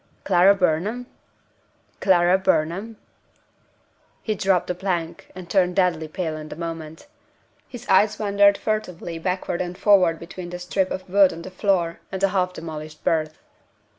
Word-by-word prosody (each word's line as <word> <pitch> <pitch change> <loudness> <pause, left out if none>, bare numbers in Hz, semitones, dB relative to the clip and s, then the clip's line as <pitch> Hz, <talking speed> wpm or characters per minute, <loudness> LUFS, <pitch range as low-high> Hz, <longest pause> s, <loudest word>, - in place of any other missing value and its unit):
"Clara 190 +1 +5
Burnham? 195 +7 0 0.9
Clara 180 -2 +4
Burnham?" 190 +6 0 1.3
He 215 - -1
dropped 190 -3 +1
the - - -2
plank, 175 -3 -4
and 185 -2 -9
turned 180 -1 +1
deadly 175 -5 +1
pale 160 0 -4
in 155 0 -9
a - - -6
moment. 165 - -7 0.6
His 245 - -10
eyes 210 +2 +4
wandered 200 -1 +3
furtively 180 -6 -3
backward 180 0 -2
and 180 0 -5
forward 185 -5 +4
between 175 +1 -9
the 180 - -6
strip 185 +1 -1
of 185 - -5
wood 195 0 +5
on 165 +1 -8
the 185 - -9
floor 185 -3 0
and 190 - -4
the 195 +1 +2
half 185 -1 0
demolished 155 -3 -8
berth. 155 -1 0
180 Hz, 150 wpm, -23 LUFS, 165-195 Hz, 1.3 s, Clara